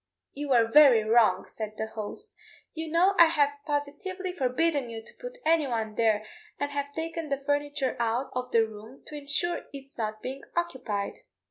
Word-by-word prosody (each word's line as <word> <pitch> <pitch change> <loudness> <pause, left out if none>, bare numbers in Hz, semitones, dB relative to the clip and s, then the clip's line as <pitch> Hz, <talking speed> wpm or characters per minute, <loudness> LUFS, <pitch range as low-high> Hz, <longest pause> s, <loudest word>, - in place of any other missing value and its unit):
"You 290 +1 -5
were 240 -3 +5
very 255 -3 +7
wrong," 215 -4 +4
said 215 -1 -6
the 220 - -1
host; 220 - -6 0.4
"you 320 0 -5
know 350 +5 +4
I 335 - +10
have 290 -3 +2
positively 300 +6 -3
forbidden 285 -2 0
you 225 -1 -7
to - - -12
put - - -7
anyone 250 -10 +1
there, 215 -1 +2 0.3
and 285 0 -1
have 285 0 -3
taken 325 -1 -4
the 275 0 -2
furniture 290 -1 0
out 235 +3 0
of 250 0 -3
the 225 -1 +4
room 220 +4 -12
to 300 - -9
ensure 295 +4 0
its 275 -2 -11
not 215 -1 -3
being 265 +2 -5
occupied." 260 -12 -2
275 Hz, 170 wpm, -28 LUFS, 225-310 Hz, 0.4 s, I